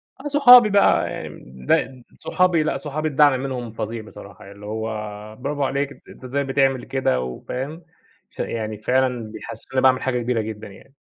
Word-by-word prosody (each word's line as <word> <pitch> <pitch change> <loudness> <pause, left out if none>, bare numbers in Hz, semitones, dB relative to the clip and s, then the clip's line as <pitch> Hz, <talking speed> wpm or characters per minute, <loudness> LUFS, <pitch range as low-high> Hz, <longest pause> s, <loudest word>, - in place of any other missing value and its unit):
آه، 270 - -8
صحابي 250 -6 +8
بقى 200 0 +3
يعني - - -8 0.2
ده 130 -2 +1 0.2
صحابي، 180 -3 +2
لأ، 155 - -1
صحابي 155 +1 -3
الدعم 145 -2 +4
منهم 125 -4 -4
فظيع 115 +1 -5
بصراحة، 100 -2 -13
اللي 100 +1 -12
هو 110 +1 -4 0.5
براڨو 145 0 -3
عليك 140 +1 -1
أنت - - -17
أنت - - -15
إزاي 140 +3 -2
بتعمل 135 -1 +1
كده؟ 125 - 0
و 65 -1 -6
فاهم، 145 +7 -5 0.5
ف - - -24
يعني 110 -2 -3
فعلًا 125 0 0
بيحسسوني 115 +3 -10
إنّي 130 - +2
باعمل 130 -1 +4
حاجة 125 -2 -1
كبيرة 120 -1 0
جدًا 110 0 -7
يعني. 100 +8 -16
130 Hz, 180 wpm, -22 LUFS, 110-145 Hz, 0.5 s, صحابي